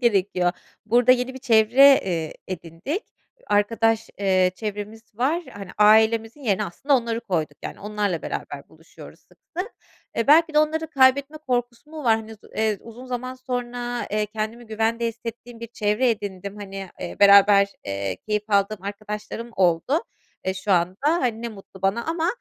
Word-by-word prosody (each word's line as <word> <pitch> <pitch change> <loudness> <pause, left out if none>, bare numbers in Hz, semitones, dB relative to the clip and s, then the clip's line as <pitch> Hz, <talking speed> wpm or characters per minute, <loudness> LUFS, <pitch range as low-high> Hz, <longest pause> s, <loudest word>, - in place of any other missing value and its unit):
gerekiyor. 195 -6 +2 0.3
Burada 245 +3 +5
yeni 250 +1 -1
bir - - -7
çevre, 255 +3 +6
eee, 165 -4 -3
edindik 185 - -5 0.4
arkadaş, 225 +2 +1
eee, 185 -2 +3
çevremiz 210 +1 -6
var, 290 +10 0
hani, 200 -2 -9
ailemizin 220 +4 +4
yerine 210 -8 0
aslında 275 +10 +1
onları 230 -2 -2
koyduk. 160 -9 -2
Yani, - - -7
onlarla 205 -4 -2
beraber - - -6
buluşuyoruz - - -15
sıklıkla. 350 +2 -8 0.5
Eee, 230 - 0
belki 320 +2 +5
de - - +5
onları 315 +1 +1
kaybetme 275 +3 +3
korkusu 245 -1 -3
mu 310 -2 -8
var, 225 -2 +5
hani, 220 0 -8
uz 220 - -13 0.2
eee, 215 -2 +1
uzun 235 +3 -11
zaman 255 +1 -4
sonra, 245 -1 -4
eee, 210 0 0
kendimi 220 +3 -5
güvende 225 +2 0
hissettiğim 230 +1 -7
bir 230 - -5
çevre 225 +2 +1
edindim. 200 -2 -5
Hani, 195 -1 -7
eee, - - -6
beraber, 200 0 +7 0.2
eee, 100 -1 -3
keyif 210 0 -1
aldığım 200 0 +1
arkadaşlarım 210 +3 -6
oldu, 185 - +2 0.4
eee, 190 - -1
şu 195 +1 -1
anda, 180 +1 +2
hani, 250 -9 0
ne 235 - -2
mutlu 195 -3 -13
bana 195 +5 +1
ama 325 0 -1
220 Hz, 160 wpm, -23 LUFS, 200-245 Hz, 0.5 s, beraber